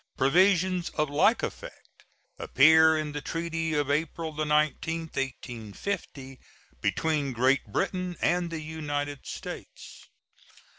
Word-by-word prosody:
Provisions 180 Hz, +4 st, +3 dB
of 150 Hz, -2 st, 0 dB
like 145 Hz, -, +3 dB
effect -, -, -8 dB, 0.3 s
appear 160 Hz, +3 st, +5 dB
in 155 Hz, -1 st, -3 dB
the 150 Hz, 0 st, -5 dB
treaty 165 Hz, 0 st, -2 dB
of 145 Hz, -1 st, 0 dB
April 160 Hz, +2 st, -2 dB
19, 155 Hz, +2 st, 0 dB
1850, 135 Hz, -, -5 dB, 0.4 s
between 150 Hz, -4 st, 0 dB
Great 130 Hz, +3 st, +2 dB
Britain 180 Hz, -, -2 dB
and 175 Hz, +1 st, +1 dB
the 165 Hz, -1 st, -5 dB
United 145 Hz, -2 st, -4 dB
States. -, -, -9 dB
155 Hz, 105 wpm, -27 LUFS, 145-165 Hz, 0.4 s, appear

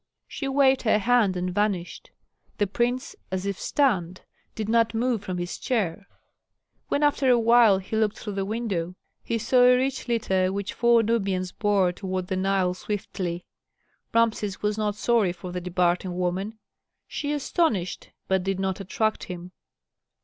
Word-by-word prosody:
She 275 Hz, -, -5 dB
waved 270 Hz, -1 st, +3 dB
her 220 Hz, -2 st, +3 dB
hand 215 Hz, -3 st, +2 dB
and 180 Hz, 0 st, -2 dB
vanished. 200 Hz, -3 st, -2 dB, 0.5 s
The 205 Hz, -, +2 dB
prince, 245 Hz, +6 st, -1 dB
as 185 Hz, 0 st, -3 dB
if 200 Hz, -1 st, -3 dB
stunned, 185 Hz, -, 0 dB, 0.3 s
did 215 Hz, -2 st, -3 dB
not 230 Hz, 0 st, +2 dB
move 235 Hz, -1 st, 0 dB
from 185 Hz, -3 st, -4 dB
his 175 Hz, 0 st, -4 dB
chair. 200 Hz, -5 st, -1 dB, 0.8 s
When 290 Hz, -, 0 dB
after 285 Hz, -2 st, +3 dB
a 245 Hz, -, +6 dB
while 230 Hz, -3 st, +5 dB
he 190 Hz, +3 st, -5 dB
looked 215 Hz, -1 st, +1 dB
through 210 Hz, -, -6 dB
the 195 Hz, 0 st, -1 dB
window, 195 Hz, -5 st, -3 dB, 0.3 s
he 230 Hz, -, -1 dB
saw 235 Hz, +3 st, +3 dB
a 250 Hz, 0 st, +7 dB
rich 265 Hz, +1 st, -2 dB
litter 190 Hz, -6 st, +1 dB
which 200 Hz, 0 st, -3 dB
four 235 Hz, -1 st, +4 dB
Nubians 195 Hz, -5 st, 0 dB
bore 200 Hz, -4 st, +2 dB
toward 185 Hz, 0 st, -4 dB
the 190 Hz, -, 0 dB
Nile 190 Hz, -1 st, +1 dB
swiftly. 185 Hz, -3 st, -4 dB, 0.7 s
Rameses 220 Hz, -4 st, 0 dB
was 210 Hz, 0 st, +1 dB
not 210 Hz, -1 st, -1 dB
sorry 215 Hz, -5 st, +2 dB
for 180 Hz, 0 st, -8 dB
the 180 Hz, 0 st, -4 dB
departing 180 Hz, 0 st, 0 dB
woman; 185 Hz, +4 st, -2 dB, 0.5 s
she 290 Hz, -1 st, -3 dB
astonished, 290 Hz, -, -1 dB, 0.2 s
but 190 Hz, -1 st, +2 dB
did 190 Hz, 0 st, -2 dB
not 190 Hz, 0 st, -1 dB
attract 215 Hz, +3 st, -1 dB
him. 180 Hz, -1 st, -8 dB
205 Hz, 160 wpm, -25 LUFS, 185-235 Hz, 0.8 s, a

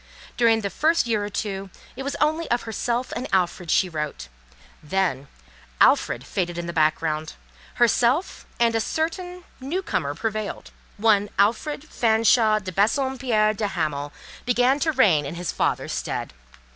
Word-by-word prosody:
During 230 Hz, -2 st, +3 dB
the 200 Hz, -2 st, -3 dB
first 325 Hz, 0 st, +2 dB
year 220 Hz, -3 st, 0 dB
or 205 Hz, -, -4 dB
two, 195 Hz, -1 st, -4 dB, 0.3 s
it 265 Hz, -, -6 dB
was 280 Hz, +1 st, -3 dB
only 315 Hz, +2 st, 0 dB
of 240 Hz, 0 st, +1 dB
herself 235 Hz, +2 st, -2 dB
and 255 Hz, -, -3 dB
Alfred 180 Hz, -2 st, 0 dB
she 185 Hz, -, +3 dB
wrote; 150 Hz, -, -5 dB, 0.5 s
then, 150 Hz, -4 st, -1 dB, 0.5 s
Alfred -, -, +3 dB
faded 175 Hz, -3 st, -2 dB
in 175 Hz, -, -3 dB
the 170 Hz, -, -5 dB
background; 155 Hz, -1 st, 0 dB, 0.4 s
herself 240 Hz, +7 st, +2 dB
and 235 Hz, -1 st, +3 dB
a 225 Hz, -, +1 dB
certain, 355 Hz, +7 st, -3 dB, 0.2 s
new 315 Hz, +9 st, -3 dB
comer 145 Hz, -, -2 dB
prevailed; 215 Hz, +3 st, -4 dB, 0.3 s
one 205 Hz, -1 st, +3 dB
Alfred 235 Hz, +9 st, +1 dB
Fanshawe 225 Hz, -3 st, +3 dB
de 190 Hz, -1 st, -6 dB
Bassompierre 225 Hz, -, +1 dB
de 210 Hz, 0 st, -2 dB
Hamal 150 Hz, -6 st, -2 dB, 0.3 s
began 250 Hz, +3 st, +2 dB
to 315 Hz, +1 st, +1 dB
reign 200 Hz, -, +4 dB
in 145 Hz, +4 st, -6 dB
his 175 Hz, -1 st, -3 dB
father's -, -, -1 dB
stead. -, -, -4 dB
215 Hz, 150 wpm, -24 LUFS, 175-255 Hz, 0.5 s, reign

